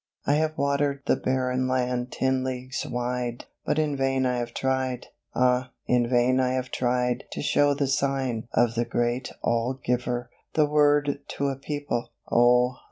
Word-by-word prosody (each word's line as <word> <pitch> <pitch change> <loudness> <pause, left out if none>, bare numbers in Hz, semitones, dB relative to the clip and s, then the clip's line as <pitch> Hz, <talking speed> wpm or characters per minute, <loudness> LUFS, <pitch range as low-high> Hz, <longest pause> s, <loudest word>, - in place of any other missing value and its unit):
I 145 - +3
have 155 +1 0
watered 140 0 0
the - - +3
barren 130 0 0
land 125 -1 -1
ten 130 0 0
leagues 130 0 -4
wide! 125 0 -3 0.2
But - - +1
in 150 -2 +1
vain 135 -1 +1
I 125 -1 +1
have 120 -1 -4
tried, 130 -2 -1 0.3
ah! 125 0 +2
in 120 -1 +2
vain 125 +1 +3
I 130 0 +2
have 130 -1 -2
tried 125 0 0
To - - -4
show 145 0 +3
the 140 0 0
sign 135 -4 -1
of 120 -1 +3
the 120 0 +1
Great 120 +2 -1
All 120 +2 +1
Giver, 120 0 -1 0.2
The 155 - +5
Word 145 -1 +3 0.2
to 140 0 +1
a 135 - -2
people: 145 -3 -3 0.2
O! 125 +1 +4
130 Hz, 165 wpm, -26 LUFS, 125-140 Hz, 0.3 s, The